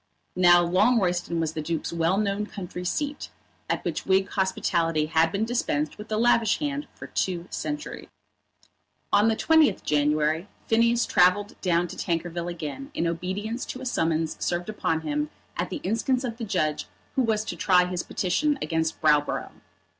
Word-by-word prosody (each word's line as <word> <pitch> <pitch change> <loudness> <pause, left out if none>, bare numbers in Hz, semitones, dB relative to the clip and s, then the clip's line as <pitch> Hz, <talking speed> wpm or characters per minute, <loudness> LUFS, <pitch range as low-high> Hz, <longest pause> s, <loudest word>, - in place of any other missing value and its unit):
Now 175 -1 +6
Longroyston 180 -3 +2
was 160 -1 -1
the 155 - -3
Duke's 165 +2 -3
well 170 +3 +1
known 210 0 0
country 180 -3 -7
seat, 285 +10 -3 0.4
at - - -1
which - - -3
Whig 190 +1 +3
hospitality 170 -5 0
had 160 +1 +2
been 200 +4 0
dispensed 155 -11 -1
with 215 +1 -9
a 215 - +1
lavish 230 -2 +3
hand 290 -1 -3
for - - -9
two 175 -2 -2
centuries. 295 0 -5 1.1
On 210 +2 +5
the 225 - +3
20th 320 +3 +3
January 150 +3 +1 0.2
Phineas 230 +1 +3
travelled 190 +3 +3
down 175 -1 +2
to - - -9
Tankerville 170 0 -2
again 170 - -6
in 170 - 0
obedience 190 +8 -3
to 255 - -6
a - - -6
summons 165 -8 -1
served 175 +3 -1
upon 165 -6 -1
him 295 - -2 0.3
at - - -2
the - - -3
instance 245 +5 0
of 235 -3 -4
the 235 - -4
judge 155 -7 -1 0.3
who 265 - +3
was 220 -3 +1
to - - -4
try 180 -2 +4
his 180 -1 -2
petition 280 - 0
against 160 -1 -1
Browborough. 150 -1 +2
185 Hz, 165 wpm, -26 LUFS, 165-225 Hz, 1.1 s, Now